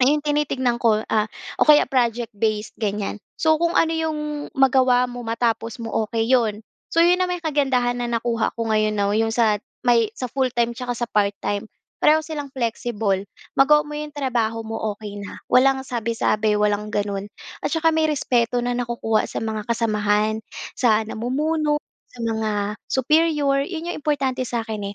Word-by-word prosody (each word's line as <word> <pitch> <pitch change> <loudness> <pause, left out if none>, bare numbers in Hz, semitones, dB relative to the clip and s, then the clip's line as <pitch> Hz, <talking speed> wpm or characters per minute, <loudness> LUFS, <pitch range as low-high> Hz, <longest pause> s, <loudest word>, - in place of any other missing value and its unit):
ngayon 295 +3 +3
tinitignan 275 -5 0
ko, 220 -2 +3
ah, 215 0 +2 0.3
o - - +5
kaya 300 0 +8
project-based, 225 -4 0
ganyan. 210 -1 -2 0.2
So 315 -1 +4
kung 340 0 +1
ano 325 - +3
‘yong 320 -1 -1 0.4
magawa 255 -2 +4
mo, 245 0 -7
matapos 230 0 -1
mo, 225 - -5 0.2
okey 225 -1 0
‘yon. 225 -5 +2 0.3
So 330 - +3
‘yon 355 +1 +4
naman 360 -1 -1
'yong 320 - -1
kagandahan 250 -4 +1
na 240 - -1
nakuha 230 0 0
ko 230 -1 -3
ngayon 215 0 +2
now, 200 0 +1
‘yong 225 0 +1
sa 220 -3 +3 0.3
may, 235 -3 +4
sa 255 - -4
full-time 245 -3 +1
tsaka 250 -1 -3
sa 240 - -1
part-time, 205 0 0 0.3
pareho 310 +1 +5
silang 295 -3 -5
flexible. 225 -5 -1 0.3
Magawa 300 +2 +6
mo 300 - -8
‘yong 300 -1 -6
trabaho 235 -5 -1
mo, 225 0 -4 0.2
okey 205 -1 -8
na, 200 - -8
walang 265 +1 +4
sabi-sabi, 225 -3 0
walang 210 0 0
gano’n, 200 -1 -2 0.4
at - - +2
tsaka 325 0 +3
may 315 0 +3
respeto 245 -4 +1
na 245 - -1
nakukuha 235 -2 0
sa - - -5
mga 220 -1 -3
kasamahan, 215 -2 +1 0.4
sa 220 -3 +3
namumuno, 295 +7 0 0.3
sa 250 - -18
mga 220 -1 -1 0.4
superior, 285 0 +2
yon 335 -2 -5
‘yong - - -4
importante 275 -4 0
sa’kin, 220 -4 -4
240 Hz, 165 wpm, -22 LUFS, 220-275 Hz, 0.4 s, kaya